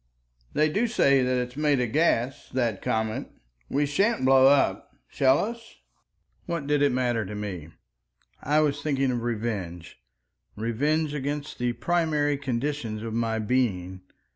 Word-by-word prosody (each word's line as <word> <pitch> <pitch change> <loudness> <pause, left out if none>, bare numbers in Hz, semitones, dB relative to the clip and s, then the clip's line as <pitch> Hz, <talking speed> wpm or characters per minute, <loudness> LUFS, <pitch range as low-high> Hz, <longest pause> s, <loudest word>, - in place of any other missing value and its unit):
"They 155 - +3
do 205 +10 0
say 140 - +3
that 125 0 +1
it 125 0 -1
is 125 - -16
made 150 -3 +2
of 120 -3 -1
gas, 135 -4 +1
that 120 -6 0
comet. 110 0 -1 0.4
We 145 +1 +1
sha'n't 195 - +1
blow 130 0 +6
up, 140 0 +2
shall 135 0 +3
us?"... 230 +4 -5 0.7
What 170 -4 -3
did 145 0 +1
it 145 -1 +4
matter 120 -3 0
to 105 +1 -7
me? 95 -7 -5 0.7
I 150 +2 +2
was 145 -1 0
thinking 135 -3 0
of 120 -1 -2
revenge—revenge 110 - -4
against 145 +1 -4
the 120 0 0
primary 150 +1 +1
conditions 125 -4 -3
of 115 -1 -5
my 115 -1 0
being. 105 -6 -1
130 Hz, 145 wpm, -26 LUFS, 110-145 Hz, 0.7 s, blow